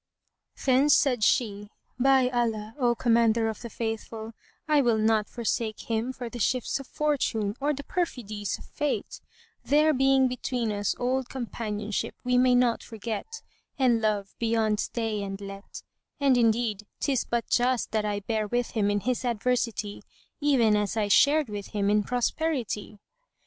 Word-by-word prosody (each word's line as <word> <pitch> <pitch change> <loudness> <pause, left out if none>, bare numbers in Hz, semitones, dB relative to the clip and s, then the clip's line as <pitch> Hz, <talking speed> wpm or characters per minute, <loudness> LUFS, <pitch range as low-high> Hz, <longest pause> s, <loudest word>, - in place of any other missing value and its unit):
Then 270 +2 +4
said 255 -6 +4
she, 205 -3 +1 0.3
"By 265 0 +4
Allah, 225 -3 -1
O 240 -2 +2
Commander 230 -1 +3
of 220 - -4
the 235 - -7
Faithful, 225 0 -5 0.3
I 300 -2 +4
will 235 -4 +2
not 215 -1 +2
forsake 230 -2 -2
him 230 +2 -2
for 255 -2 -6
the 240 +1 -7
shifts 255 +4 0
of 275 - -9
Fortune 240 -9 -1
or 290 +2 +1
the 285 -1 -4
perfidies 220 - -3
of - - -14
Fate, 295 -2 -3 0.4
there 305 +2 +4
being 270 0 +4
between 250 -2 -2
us 205 -1 -1
old 255 +1 -1
companionship 215 -4 -4
we 250 0 +2
may 250 0 +4
not 245 -1 +2
forget, 230 - -6 0.3
and 245 -4 +3
love 205 -3 -1
beyond 225 -2 +1
stay 225 -3 -2
and 195 -1 -5
let; 195 0 -9 0.4
and 275 -2 +4
indeed 225 -3 +1
'tis 270 -4 +1
but 235 -1 -2
just 245 -1 +1
that 215 -1 0
I 205 -1 -2
bear 215 +1 -1
with 240 +2 -1
him 205 -3 +1
in 205 0 0
his 250 +3 -1
adversity, 235 -3 -1 0.4
even 260 -8 +3
as 210 +1 -1
I 210 -2 0
shared 290 +7 +5
with 205 -2 -6
him 200 0 +2
in 210 0 +4
prosperity." 245 -2 -2
235 Hz, 160 wpm, -27 LUFS, 215-255 Hz, 0.4 s, shared